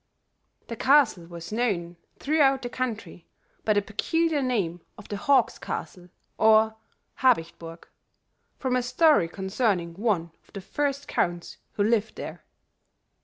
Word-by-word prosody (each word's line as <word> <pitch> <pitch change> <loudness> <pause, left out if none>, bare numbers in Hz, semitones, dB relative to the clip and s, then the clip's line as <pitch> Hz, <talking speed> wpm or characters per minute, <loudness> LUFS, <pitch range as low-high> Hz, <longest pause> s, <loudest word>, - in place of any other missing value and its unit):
The 230 - -6
castle 255 -10 +3
was 170 +1 -9
known 200 -7 -1 0.2
throughout 275 -3 +2
the 245 - -3
country 230 -9 -5 0.4
by 215 - +2
the 205 -1 +1
peculiar 315 +9 0
name 195 -10 -1 0.2
of 210 - -12
the 205 - -3
Hawk's 265 +2 +2
Castle 180 -1 -6 0.3
or 220 0 +5 0.4
Habicht 225 -11 +2
burg, 165 0 -10 0.7
from 260 -1 -1
a 250 - +2
story 255 - +3
concerning 190 -1 -1
one 185 -4 -1 0.2
of - - -26
the 195 - -6
first 285 +6 -2
counts 175 -1 -2 0.2
who 205 - 0
lived 220 0 +1
there. - - -8
220 Hz, 135 wpm, -26 LUFS, 175-255 Hz, 0.7 s, or